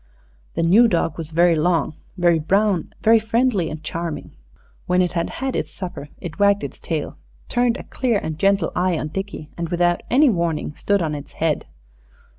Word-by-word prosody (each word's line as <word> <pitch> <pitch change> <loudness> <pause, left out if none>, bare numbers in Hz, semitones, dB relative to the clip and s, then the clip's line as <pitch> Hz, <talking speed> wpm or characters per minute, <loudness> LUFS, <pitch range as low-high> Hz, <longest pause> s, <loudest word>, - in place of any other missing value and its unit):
The - - 0
new 205 +8 +6
dog 170 -5 0
was 160 -2 -6
very 170 +1 +4
long, 165 +1 +1 0.2
very 175 -2 +3
brown, 195 +2 +1
very 225 +1 +6
friendly 225 -4 +1
and 155 0 -7
charming. 165 +1 -4 0.6
When 180 0 +2
it 180 -1 +2
had 170 -1 -1
had 265 0 -3
its - - -2
supper 175 -6 -7
it 170 +1 -8
wagged 200 0 +4
its - - -6
tail, - - -4 0.3
turned 245 0 +2
a - - -8
clear 245 -5 0
and 160 -5 -4
gentle 195 -3 +2
eye 180 -1 +1
on 155 - -3
Dickie, 195 -3 -6
and 170 -1 -2
without 175 0 +1
any 275 +1 +5
warning 170 -5 -1
stood 200 -3 +1
on 155 -2 -1
its 145 -1 -7
head. 160 -2 -1
175 Hz, 185 wpm, -21 LUFS, 165-205 Hz, 0.6 s, new